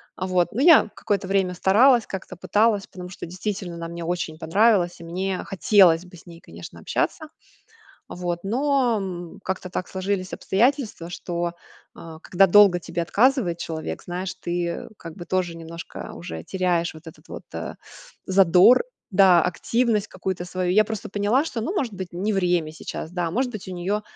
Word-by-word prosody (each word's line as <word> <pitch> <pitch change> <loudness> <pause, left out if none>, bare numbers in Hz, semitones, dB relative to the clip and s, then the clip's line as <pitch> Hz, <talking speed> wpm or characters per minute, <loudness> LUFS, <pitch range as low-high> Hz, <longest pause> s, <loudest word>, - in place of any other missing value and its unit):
А, - - -4
вот, 185 -2 +1
ну, 240 - -2
я 320 -7 +7
какое-то 200 -2 -2
время 190 -2 +1
старалась, 230 +7 +4
как-то 190 -1 -7
пыталась, 205 +3 +1
потому 180 -1 -9
что 180 - -8
действительно 185 0 -5
она 170 0 -6
мне 170 0 -7
очень 165 -2 -3
понравилась, 190 0 +2
и 170 - -10
мне 185 +2 -3
хотелось 185 -3 +4
бы 180 -1 -14
с - - -17
ней, 170 -2 -12
конечно, 85 +1 -11
общаться. - - -2 0.8
А - - -9
вот, 175 -1 -3
но, 260 +1 +1
м, 175 -3 -7
как-то 190 0 -4
так 180 0 -4
сложились 190 0 -3
обстоятельства, 225 - 0
что, 175 -1 -4 0.4
а, 160 -1 -11
когда 190 +3 +3
долго 195 -1 +6
тебе 170 0 -4
отказывает 210 - +2
человек, 160 - -5
знаешь, 180 +1 -4
ты, 175 0 -2
э, - - -6
как 165 -2 -10
бы 175 - -8
тоже 175 -3 -1
немножко 165 0 -8
уже 80 -1 -7
теряешь 175 -3 0
вот 155 +1 -14
этот 160 - -13
вот, - - -8
э, - - -5 0.5
задор, 190 - +5 0.3
да, 185 -3 +6
активность 215 +5 0
какую-то 185 -1 -4
свою. 180 0 -2
Я 215 +3 +5
просто 215 -2 -6
поняла, 210 +9 +1
что, 240 -8 -4
ну, 340 - -3
может 250 - -2
быть, 185 -2 -7
не 195 +5 -2
время 175 -5 +1
сейчас, 160 0 -7
да, 175 -2 -2
может 250 +4 -1
быть, 215 - -7
у - - -6
неё 195 +4 -2
185 Hz, 180 wpm, -23 LUFS, 175-205 Hz, 0.8 s, я